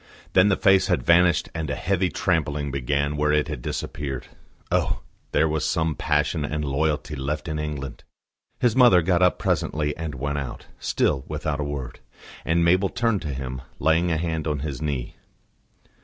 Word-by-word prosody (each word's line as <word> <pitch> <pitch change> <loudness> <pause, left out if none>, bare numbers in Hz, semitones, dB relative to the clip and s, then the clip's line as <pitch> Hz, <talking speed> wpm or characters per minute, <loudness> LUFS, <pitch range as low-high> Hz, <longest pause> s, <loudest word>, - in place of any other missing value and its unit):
Then 95 +2 +6
the 95 - +4
face 95 -2 +4
had 60 - +1
vanished 85 +3 +4
and 80 -2 -3
a 75 - -1
heavy 95 -1 0
trampling 75 -6 0
began 70 +2 -1
where 75 +1 +2
it 75 0 +2
had 75 -5 -4
disappeared. 70 +1 -4 0.5
Oh! - - +1 0.3
there 80 - +3
was 80 -1 -1
some 80 0 +1
passion 75 +1 0
and 75 +1 -2
loyalty 75 +2 -1
left 75 +4 -3
in 75 -1 -2
England! 75 -4 -5 0.6
His 120 -3 +2
mother 120 -10 +6
got 90 0 +2
up 90 -1 +4
presently 75 -1 0
and 80 -2 -5
went 70 +2 -2
out, 70 -4 -6
still 70 -3 0
without 75 -1 -3
a - - 0
word; 70 -4 -5 0.4
and 85 +1 +2
Mabel 95 +3 +3
turned 115 -5 0
to 75 -3 -4
him, 65 -1 -5 0.2
laying 80 +4 +2
a 80 - +1
hand 80 -1 -2
on 75 -2 -1
his 70 -4 -4
knee. 70 -5 -3
75 Hz, 175 wpm, -24 LUFS, 70-85 Hz, 0.6 s, Then